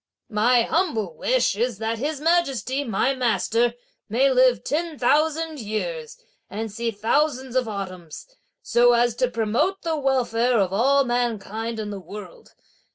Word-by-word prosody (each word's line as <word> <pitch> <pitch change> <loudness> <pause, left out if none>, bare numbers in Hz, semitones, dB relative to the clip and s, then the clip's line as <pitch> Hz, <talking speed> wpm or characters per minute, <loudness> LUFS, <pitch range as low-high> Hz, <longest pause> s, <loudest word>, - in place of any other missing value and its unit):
My 235 +3 +3
humble 225 - -1
wish - - +1
is 235 0 -1
that 225 +1 -3
His 295 +2 -2
Majesty, 285 - +1
my 245 +3 0
master, 240 -1 +1 0.3
may 260 +6 +3
live 255 -1 +3
ten 320 +1 -2
thousand 310 +4 +1
years 180 -8 -4 0.3
and 220 +1 -5
see 230 +3 -2
thousands 255 +4 0
of 255 -2 +1
autumns, 185 -6 -7 0.4
so 240 0 +4
as 240 0 +3
to 255 -1 +1
promote 235 - -1
the 330 -2 -1
welfare 250 -3 +1
of 190 -3 +1
all 275 +7 +3
mankind 230 -2 -2
in 210 -1 -4
the 200 - -6
world! 210 - -11
240 Hz, 145 wpm, -23 LUFS, 215-275 Hz, 0.4 s, so